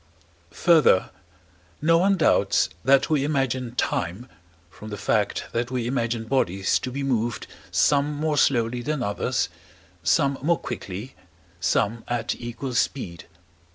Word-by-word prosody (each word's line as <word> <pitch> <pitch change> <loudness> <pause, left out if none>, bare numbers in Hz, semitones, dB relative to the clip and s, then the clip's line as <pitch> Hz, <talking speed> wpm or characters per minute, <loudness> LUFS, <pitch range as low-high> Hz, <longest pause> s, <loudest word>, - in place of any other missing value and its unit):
Further, 160 - +5 0.7
no 165 +2 +4
one 195 +2 +3
doubts 160 - +3
that 135 +3 +4
we 145 -3 +2
imagine 130 -4 -1
time, 95 +2 -2 0.4
from 85 +7 -11
the 105 - -5
fact 105 0 0
that 120 +1 -1
we 125 -2 -2
imagine 120 -2 -1
bodies 100 -6 +1
to 125 - -5
be 140 +2 -3
moved 120 -3 -1 0.2
some 145 +1 +2
more 150 0 0
slowly 120 -1 +2
than 150 +1 -2
others, 100 -3 -1 0.5
some 140 - +2
more 165 +4 +2
quickly, 120 -2 -6 0.5
some 115 +3 0
at 120 -1 -1
equal 120 +2 -5
speed. 90 -8 -2
125 Hz, 130 wpm, -24 LUFS, 115-140 Hz, 0.7 s, Further